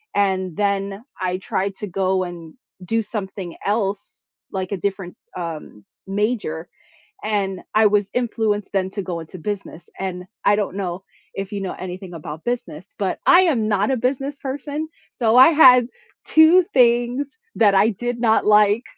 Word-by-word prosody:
And 190 -3 0
then 200 +1 -1 0.2
I 180 0 -1
tried 190 +1 -2
to 210 - -5
go 190 0 0
and 170 -3 -9 0.3
do 225 +4 +1
something 195 -4 -6
else, 200 -1 -2 0.3
like 190 0 -4
a 200 - -1
different, 195 -1 -4 0.2
um, 160 - -7 0.2
major, 195 -5 -2 0.6
and 195 -3 -1
I 215 0 +5
was 205 -1 +2
influenced 220 -4 -1
then 190 -1 0
to 200 - -3
go 175 -2 -4
into 165 +3 -10
business, 195 -2 -6
and 180 -1 -4 0.2
I 205 - +5
don't 200 -2 -2
know 185 -2 -4 0.3
if 195 +1 -5
you 200 - -3
know 190 - -4
anything 185 0 -7
about 155 -1 -8
business, 200 -8 -5
but 195 -2 -1
I 355 0 +8
am 265 -12 +2
not 205 +1 +1
a 265 - +2
business 270 +3 -2
person. 285 +3 -4 0.2
So 230 -2 +2
I 260 +3 +9
had 250 -6 +7 0.4
2 315 +4 +6
things 245 +1 +2 0.3
I 205 0 +5
did 240 +3 -4
not 220 -2 +3
like. 210 +2 +4
200 Hz, 160 wpm, -21 LUFS, 185-235 Hz, 0.6 s, I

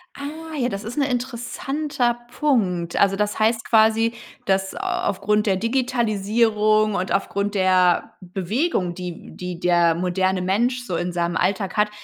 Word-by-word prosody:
Ah, 315 +3 -7
ja, 250 -3 0
das 200 -2 -5
ist 225 +5 -7
'n 290 - +3
interessanter 250 +1 -2
Punkt. 185 - 0
Also, 195 -1 +4
das 210 +1 -1
heißt 225 +1 +2
quasi, 225 +1 +4 0.3
dass 190 0 0
au - - -7
aufgrund 210 - 0
der 195 -3 +2
Digitalisierung 215 -2 +1
und 185 0 -2
aufgrund 200 +1 -1
der 185 -2 +3
Bewegung, 185 - -1
die 180 -2 -8
die 180 -1 -6
der 175 -2 +3
moderne 185 +2 0
Mensch 240 +7 0
so 185 - -3
in 175 +1 -2
seinem 170 0 -1
Alltag 195 0 -1
hat, 210 0 +3
210 Hz, 150 wpm, -22 LUFS, 185-240 Hz, 0.3 s, Also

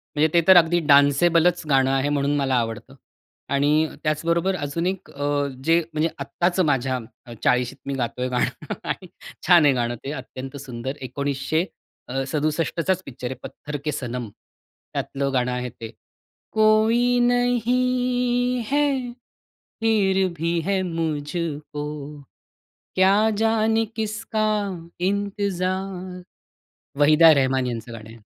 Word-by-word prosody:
म्हणजे 150 +1 +4
ते 170 - +5
तर 190 -1 +9
अगदी 175 +1 +4
डान्सेबलच 165 +5 +4
गाणं 135 -1 +3
आहे, 135 +1 +1
म्हणून 145 0 +1
मला 135 -2 +1
आवडतं 115 -2 -5 0.5
आणि 150 +3 +2 0.2
त्याचबरोबर 170 +4 0
अजून 150 +2 -3
एक 190 0 -4
अ, 145 0 -1 0.2
जे, 165 +3 +4
म्हणजे 160 +2 +1
आत्ताच 175 +1 -1
माझ्या 135 -5 +1 0.4
40शीत 125 +1 +1
मी 140 - -2
गातोय 125 0 -2
गाणं 125 -1 -2
आणि - - -4 0.4
छान 170 -4 +7
आहे 140 - +5
गाणं 120 -1 -1
ते 140 - -4
अत्यंत 130 +2 -8
सुंदर 130 +2 -5
1900 140 +5 -1 0.4
अ, 135 +1 -2
67चाच 165 +5 -1
पिक्चर 125 -2 -6
आहे, 130 - -5
पत्थर 150 0 -7
के 150 - 0
सनम, 125 -5 -4 0.6
त्यातलं 140 0 -2
गाणं 125 -1 +1
आहे 125 0 -3
ते. 115 -1 -9 0.6
कोई 225 +3 +3
नहीं 245 0 +1
है, 290 +1 +3 0.9
फिर 195 -4 +2
भी 170 +2 0
है 195 -1 +1
मुझको, 155 -2 -3 1.1
क्या 190 +1 +5 0.2
जाने 225 0 +2
किसका 215 0 -2 0.6
इंतजार 190 -2 -2 0.8
वहिदा 155 +2 +7
रहमान 130 -1 +1
यांचं 115 -1 -5
गाणं 110 -1 -9
आहे. 115 -2 -15
155 Hz, 125 wpm, -23 LUFS, 135-190 Hz, 1.1 s, तर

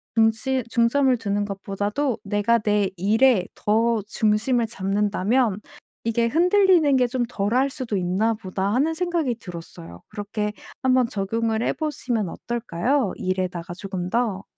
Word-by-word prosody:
중심 225 +4 +2
중점을 255 +3 +3
두는 205 -2 -1
것보다도 205 +6 -2
'내가 205 +3 +2
내 210 -2 +1
일에 215 +2 +3
더 225 +1 +1
중심을 220 +4 +1
잡는다면 205 +2 0 0.4
이게 230 0 +1
흔들리는 350 - +4
게 250 - +3
좀 245 0 -1
덜 205 -2 -1
할 270 +2 +3
수도 255 -7 -3
있나 190 +5 +1
보다.' 195 -1 -3
하는 290 +7 +2
생각이 335 -7 0
들었어요. 165 - -10
그렇게 210 0 -3 0.3
한번 255 -1 +4
적용을 225 +1 -1
해 - - +1
보시면 245 - -2
어떨까요, 235 +2 -1
일에다가 180 -2 -3
조금 185 -1 -5
더? 215 -3 0
220 Hz, 295 characters per minute, -23 LUFS, 200-255 Hz, 0.4 s, 흔들리는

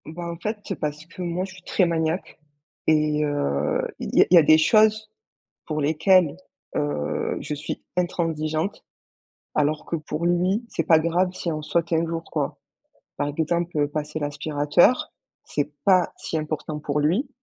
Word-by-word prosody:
Ben, 170 +3 -6
en 170 - -7
fait, 210 +3 -4
parce 150 0 -3
que 170 +2 -11
moi, 175 +1 -2
je 190 - -11
suis 185 - -14
très 185 - +2
maniaque. 165 +1 -2 0.5
Et 150 -1 +3
heu, 75 - 0 0.2
il - - -4
y - - +9
a - - -5
il - - +8
y - - +10
a - - +7
des 155 +1 +7
choses 215 +5 +4 0.6
pour 155 -1 -2
lesquelles, 160 +2 +3 0.4
heu, 75 +1 -1
je 150 - -4
suis 150 +1 -5
intransigeante, 165 -1 -1 0.7
alors 150 +1 +1
que 170 - -1
pour 155 +1 -3
lui, 180 +6 +1
c'est - - -2
pas 160 -3 +6
grave 175 +3 +1
si 185 -2 -3
on 155 -1 -3
saute 170 +2 -1
un 165 +1 +2
jour, 165 0 -3
quoi. - - -2 0.6
Par 145 - -1
exemple, 160 0 0
passer 150 +1 -4
l'aspirateur, 150 - +2 0.3
c'est 145 0 -2
pas 185 -3 +4
si - - -4
important 155 0 -4
pour 150 0 -1
lui, 180 - +1
160 Hz, 170 wpm, -24 LUFS, 150-175 Hz, 0.7 s, y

